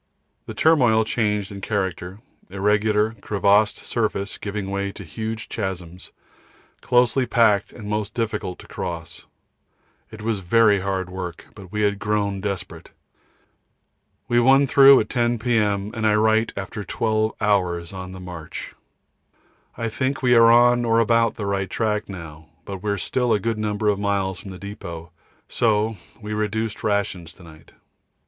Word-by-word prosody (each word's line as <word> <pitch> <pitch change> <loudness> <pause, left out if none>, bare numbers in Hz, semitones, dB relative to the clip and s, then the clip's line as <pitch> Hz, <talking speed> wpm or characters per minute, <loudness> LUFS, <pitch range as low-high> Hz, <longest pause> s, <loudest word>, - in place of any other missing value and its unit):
The - - -7
turmoil 125 -9 +4
changed 105 -3 -1
in 100 -1 -8
character, 95 -1 -3 0.3
irregular 105 +2 +1
crevassed 105 +1 +2
surface 110 -3 -3
giving 100 -1 -4
way 100 0 -2
to 100 - -10
huge 110 +6 -5
chasms, 90 -4 -6 0.7
closely 125 +1 +2
packed 110 -4 +3
and 105 -3 -10
most 105 -1 -3
difficult 105 -5 -3
to - - -14
cross. 85 -3 -7 0.8
It 110 -1 -10
was 110 -2 -1
very 105 +2 +4
heavy 95 -1 -3
work, 90 -2 -7
but 95 -3 -13
we 105 - -2
had 100 -1 +1
grown 100 -2 -1
desperate. 100 -3 -5 1.4
We 120 - +3
won 135 +3 +5
through 135 0 +7
at 105 - -5
10 120 -1 +1
P.M. 105 -3 0
and 110 -1 0
I 105 - +3
write 110 +1 +2
after 100 +1 -5
12 110 +2 0
hours 90 -4 0
on 95 -1 -7
the 95 - -9
march. 90 -4 -8 1.0
I 115 - -2
think 130 +4 -2
we 125 -1 +4
are 115 -1 +7
on 120 +1 +5
or 115 -1 +2
about 115 0 +3
the 105 - -5
right 100 -1 -1
track 105 -2 -1
now, 80 -4 -9 0.2
but 95 -2 -6
we 105 - -3
are 100 - 0
still 125 +6 0
a 105 - +2
good 115 +2 -2
number 105 0 -1
of 100 -1 +2
miles 100 -2 -1
from 100 - -10
the 95 - -8
depôt, 85 -4 -8 0.4
so 110 -1 +1 0.2
we 105 -1 -6
reduced 110 +1 -2
rations 95 -5 -1
to 95 - -16
night. 80 -1 -16
105 Hz, 155 wpm, -22 LUFS, 95-110 Hz, 1.4 s, through